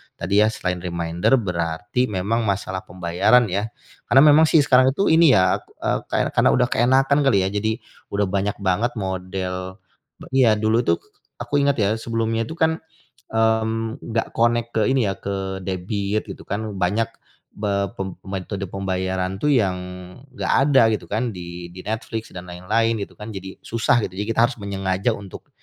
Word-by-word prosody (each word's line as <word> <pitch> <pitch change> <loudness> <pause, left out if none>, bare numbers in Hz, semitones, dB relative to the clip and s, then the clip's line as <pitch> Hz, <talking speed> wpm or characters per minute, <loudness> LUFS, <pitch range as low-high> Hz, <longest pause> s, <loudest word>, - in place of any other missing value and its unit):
tadi 100 +4 -1
ya, 110 - +5
selain 90 -3 -2
reminder, 85 +2 -1
berarti 90 +2 -1
memang 105 +3 -1
masalah 95 -1 -2
pembayaran 90 +7 +3
ya. 100 +4 -1 0.4
Karena 135 - +6
memang 155 +2 +6
sih 155 - +5
sekarang 130 -2 +5
itu 195 - +2
ini 160 -3 +6
ya, 95 0 +3
k - - -27 0.2
eee, - - +1
kar - - 0
karena - - +4
udah 125 -1 +3
keenakan 135 +4 +3
kali 115 -8 +4
ya, 95 - 0
jadi 110 +2 -1 0.4
udah 100 0 +2
banyak 100 +1 -1
banget 100 +6 +1
model 95 -1 -4 0.5
be - - -9
iya, 130 -4 +5
dulu 110 +2 +2
tuh 85 - +3 0.4
aku 145 - -1
inget 140 -1 +2
ya, 100 -3 +2
sebelumnya 115 0 -1
tuh 160 - -7
kan, 160 -1 +3 0.6
mmm, 110 +2 +1
nggak 115 0 -2
connect 120 0 +2
ke 110 - +2
ini 130 -5 +2
ya, - - -1
ke 95 -1 -4
debit 100 +3 -2
gitu 95 - -8
kan. 100 +2 -2 0.2
Banyak 105 +5 +1 0.5
be 100 -1 -1
pem 95 -1 -4
metode 95 +1 -4
pembayaran 95 -1 -2
tuh 150 - +2
yang 100 -9 +2 0.6
nggak 130 - -2 0.2
ada 135 - +6
gitu 105 - -3
kan 115 +3 0
di 85 0 -7
di 90 +1 -10
Netflix 110 +1 -4
dan 90 0 -8
lain-lain 110 +6 0
gitu - - -10
kan. 105 - -7
Jadi 95 0 -8
susah 115 +1 +2
gitu, - - -4
jadi 105 - -1
kita 115 - +2
harus 125 - -7
menyengaja 95 +2 -1
untuk, 100 -3 -11
100 Hz, 175 wpm, -22 LUFS, 95-115 Hz, 0.6 s, Karena